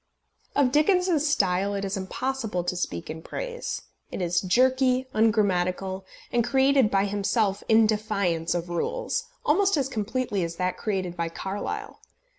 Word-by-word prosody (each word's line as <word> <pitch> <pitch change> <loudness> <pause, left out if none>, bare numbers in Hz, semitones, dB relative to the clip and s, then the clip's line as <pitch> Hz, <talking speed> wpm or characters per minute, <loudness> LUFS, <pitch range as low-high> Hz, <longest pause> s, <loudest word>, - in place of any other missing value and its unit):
Of 270 -3 +3
Dickens's 315 0 +3
style 195 -6 +1
it 200 0 -2
is 195 - -2
impossible 210 0 -2
to 180 - -2
speak 85 - -3
in 160 +1 -6
praise. 485 - -5 0.3
It - - -6
is 175 -1 +1
jerky, 255 +5 +3
ungrammatical, 190 -3 +1 0.2
and 240 -1 +2
created 265 -1 +3
by 195 0 +2
himself 205 0 0
in 220 0 +6
defiance 200 -6 0
of 175 0 -3
rules 475 - -2 0.2
almost 385 +3 +3
as 270 -2 +1
completely 220 -3 -2
as 170 0 -4
that 180 +1 -1
created 185 -5 -2
by 170 -1 -2
Carlyle. 190 +4 -5
205 Hz, 145 wpm, -26 LUFS, 180-260 Hz, 0.3 s, in